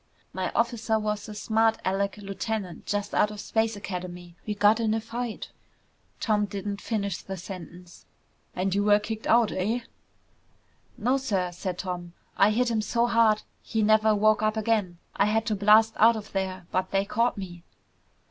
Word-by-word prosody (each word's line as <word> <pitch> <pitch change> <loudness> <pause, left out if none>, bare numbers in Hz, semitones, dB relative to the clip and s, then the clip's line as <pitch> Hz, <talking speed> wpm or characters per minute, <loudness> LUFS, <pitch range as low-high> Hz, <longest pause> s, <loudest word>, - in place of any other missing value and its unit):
"My 185 -1 -2
officer 230 -1 +1
was 210 0 -3
a 210 - -7
smart 220 +1 +2
alec 200 +2 0
lieutenant 200 -2 -5
just 205 0 -2
out 210 - +3
of 210 -1 -8
Space 220 +1 0
Academy. 180 -3 -7
We 210 - -1
got 210 +2 +4
in 220 -1 +1
a - - 0
fight 230 +1 -5 0.4
" - - -40
Tom 210 -2 +1
didn't 200 0 -5
finish 200 -5 -2
the 190 0 -6
sentence. 180 -1 -10 0.5
"And 185 +1 0
you 200 +1 +1
were 205 0 +5
kicked 215 +1 -5
out, 230 -2 +4
eh?" 215 +6 -1 1.2
"No, 250 +5 +2
sir," 195 -9 -1
said 180 +1 -5
Tom. 175 -2 -5 0.2
"I 200 - +5
hit 235 +3 +1
him 220 -1 +1
so 235 +3 +1
hard 230 -2 +3 0.2
he 220 -1 -1
never 215 0 +4
woke 215 +1 +3
up 215 0 +1
again. 210 -5 0 0.2
I 200 - +3
had 220 +1 +1
to 215 - 0
blast 215 +2 +5
out 230 +2 +6
of 215 -1 -7
there, 190 -2 -3
but 185 0 0
they 195 0 +1
caught 230 +3 0
me." 175 -3 -7
210 Hz, 175 wpm, -27 LUFS, 190-220 Hz, 1.2 s, out